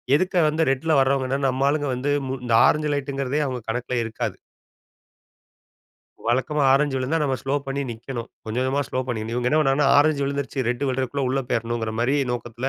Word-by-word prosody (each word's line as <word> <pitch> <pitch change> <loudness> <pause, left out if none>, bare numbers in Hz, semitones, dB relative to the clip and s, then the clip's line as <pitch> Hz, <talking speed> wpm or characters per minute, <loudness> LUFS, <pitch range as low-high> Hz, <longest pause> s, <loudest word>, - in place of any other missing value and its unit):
எதுக்கு 185 +3 +1
வந்து 155 +2 -1
ரெட்ல 135 +5 -1
வர்றவங்கன்னா 135 0 +1
நம்ம 130 +1 0
ஆளுங்க 145 0 0
வந்து 135 +3 -1 0.2
மு 130 - -2
இந்த 120 - 0
ஆரஞ்சு 150 0 +1
லைட்ங்கிறதே 140 0 -2
அவங்க 130 -1 -3
கணக்கில 125 +1 -2
இருக்காது. 110 0 -4 1.9
வழக்கமா 130 +5 +1
ஆரஞ்சு 140 0 +2
விழுந்தா 130 +5 0
நம்ம 135 -3 0
ஸ்லோ 135 +1 -1
பண்ணி 135 +1 -2
நிக்கணும். 120 +1 -6 0.2
கொஞ்சம் 110 +3 -2
கொஞ்சமா 135 +2 +1
ஸ்லோ 130 - -1
பண்ணிக்கணும். 115 -2 -3
இவங்க 125 0 0
என்ன 155 - +3
பண்ணாங்கன்னா 135 -1 +3
ஆரஞ்சு 145 0 +3
விழுந்துருச்சு 140 -2 -2
ரெட் 125 +3 -1
விழுறதுக்குள்ள 130 +1 -1
உள்ள 135 +1 +1
போயிராணுங்கற 115 -1 -1
மாரி 130 +4 +2 0.2
நோக்கத்தில 120 +1 -4
135 Hz, 170 wpm, -23 LUFS, 125-145 Hz, 1.9 s, என்ன